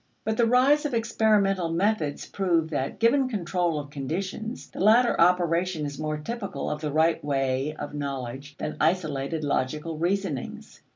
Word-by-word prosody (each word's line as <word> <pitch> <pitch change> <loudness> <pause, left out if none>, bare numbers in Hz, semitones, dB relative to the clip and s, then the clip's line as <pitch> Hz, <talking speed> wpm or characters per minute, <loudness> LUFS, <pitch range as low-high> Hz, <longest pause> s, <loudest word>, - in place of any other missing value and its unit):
But 220 +1 -1
the 235 0 +3
rise 265 +5 +4
of 270 - -3
experimental 210 -5 +2
methods 175 -4 0
proved 170 -5 0
that, 135 -2 -2
given 255 +3 +3
control 175 -6 -1
of 145 -1 -8
conditions, 190 - -5
the - - -9
latter 225 +3 +4
operation 175 -1 +2
is 145 0 -6
more 155 0 -2
typical 200 +6 -4
of 150 0 -4
the 150 -2 -2
right 160 +3 +2
way 135 +1 -1
of 145 -1 -6
knowledge 140 -1 -5
than 150 - -4
isolated 155 -2 0
logical 150 +3 -2
reasonings. 175 -5 -3
165 Hz, 155 wpm, -26 LUFS, 145-200 Hz, -, rise